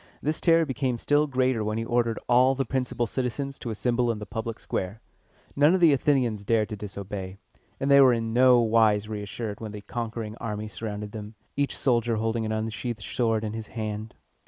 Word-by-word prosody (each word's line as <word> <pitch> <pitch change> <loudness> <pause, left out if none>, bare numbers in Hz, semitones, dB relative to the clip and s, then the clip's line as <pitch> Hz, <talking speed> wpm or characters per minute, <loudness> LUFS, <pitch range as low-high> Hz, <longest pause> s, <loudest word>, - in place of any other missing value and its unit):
This 155 +2 -2
terror 165 -1 +4
became 130 -3 -1
still 145 +5 +2
greater 130 -4 +1
when 105 +1 -2
he 115 - -2
ordered 120 -1 +1
all 125 +2 +5
the 135 0 -1
principal 125 -1 -1
citizens 135 +3 -3
to 120 - -5
assemble 120 +2 0
in 115 - -4
the 105 - -7
public 115 +1 -5
square. 95 +4 -4 0.6
None 150 +5 +5
of - - +1
the 165 -4 +6
Athenians 125 -6 +1
dared 110 0 +1
to 110 - -4
disobey, 100 -2 -6 0.4
and 140 +1 0
they 140 0 +8
were 130 -2 +7
in 115 -1 -1
no 125 0 +6
wise 110 -2 +3
reassured 105 0 -5
when 110 -2 -6
the 105 - -7
conquering 115 -1 -5
army 105 -1 -4
surrounded 105 -1 -5
them, 105 0 -8 0.2
each 140 0 -1
soldier 120 -3 +1
holding 110 0 -1
an - - -3
unsheathed 110 +1 -3
sword 115 -3 0
in 110 -1 -3
his 110 -1 -6
hand. 110 -1 -5
115 Hz, 195 wpm, -26 LUFS, 110-130 Hz, 0.6 s, they